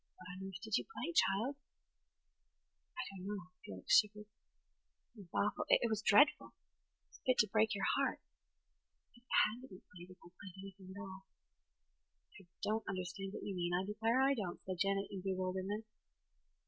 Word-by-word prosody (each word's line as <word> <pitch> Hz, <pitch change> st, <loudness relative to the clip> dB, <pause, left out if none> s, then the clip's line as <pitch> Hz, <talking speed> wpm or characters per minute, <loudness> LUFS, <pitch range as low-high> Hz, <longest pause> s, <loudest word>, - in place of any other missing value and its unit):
"What -, -, -14 dB
on 190 Hz, +1 st, -6 dB
earth 190 Hz, -1 st, -7 dB
did 220 Hz, -2 st, +1 dB
you -, -, -6 dB
play, 345 Hz, -6 st, -5 dB
child?" 255 Hz, 0 st, +2 dB, 1.4 s
"I -, -, -1 dB
don't 190 Hz, -1 st, -8 dB
know." 195 Hz, -3 st, -5 dB
Felix 95 Hz, -2 st, +4 dB
shivered. 210 Hz, 0 st, -3 dB
"It 215 Hz, +2 st, -36 dB
was 195 Hz, -4 st, -12 dB
awful–it 220 Hz, +3 st, +2 dB
was 215 Hz, -1 st, 0 dB
dreadful. 215 Hz, +6 st, +5 dB, 0.6 s
It -, -, -46 dB
was -, -, -17 dB
fit 255 Hz, -1 st, +3 dB
to 215 Hz, -, +5 dB
break 220 Hz, +1 st, +2 dB
your 195 Hz, -, -1 dB
heart. -, -, +1 dB, 0.9 s
But -, -, -21 dB
it 240 Hz, +1 st, -24 dB, 0.2 s
had 220 Hz, +4 st, -4 dB
to 260 Hz, -, -10 dB
be 185 Hz, -5 st, -13 dB
played, 175 Hz, 0 st, -11 dB
if 185 Hz, -, -13 dB
I -, -, -12 dB
played 190 Hz, -3 st, -9 dB
anything 190 Hz, -1 st, -10 dB
at -, -, -7 dB
all." 190 Hz, -1 st, -9 dB, 1.1 s
"I 195 Hz, -7 st, -15 dB, 0.2 s
don't 220 Hz, +1 st, 0 dB
understand 185 Hz, +1 st, -4 dB
what -, -, -6 dB
you 200 Hz, -, -3 dB
mean–I 175 Hz, +1 st, 0 dB
declare 225 Hz, +4 st, +1 dB
I 270 Hz, +1 st, +5 dB
don't," 200 Hz, -9 st, -3 dB
said 185 Hz, -2 st, -4 dB
Janet 195 Hz, +1 st, +2 dB
in 195 Hz, -2 st, -5 dB
bewilderment. 190 Hz, +2 st, -2 dB
195 Hz, 175 wpm, -37 LUFS, 185-220 Hz, 1.4 s, dreadful